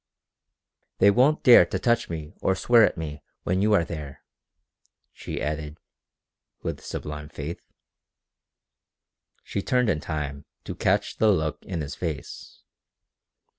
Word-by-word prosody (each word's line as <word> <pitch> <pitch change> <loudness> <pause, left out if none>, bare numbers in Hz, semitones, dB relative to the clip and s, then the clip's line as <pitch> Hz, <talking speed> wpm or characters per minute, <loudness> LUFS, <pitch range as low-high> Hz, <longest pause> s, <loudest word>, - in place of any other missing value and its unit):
"They 100 - +6
won't 130 +8 +3
dare 125 - +9
to - - -2
touch 120 -1 +1
me 80 -2 -6
or 95 - +2
swear 115 +3 +5
at 100 - +2
me 75 -3 -6 0.2
when 95 +2 0
you 105 +1 +3
are 85 -5 +3
there," 75 -4 -8 0.9
she - - -6
added, 75 0 -4 0.9
with - - -3
sublime 75 0 -6
faith. 75 +2 -6 1.8
She 100 - -3
turned 125 0 +2
in 75 - -1
time 75 -3 -5 0.2
to - - -5
catch - - 0
the 110 - +4
look 80 -5 -1
in 85 -4 -4
his 75 0 -5
face. 80 -5 -6
80 Hz, 135 wpm, -25 LUFS, 75-100 Hz, 1.8 s, dare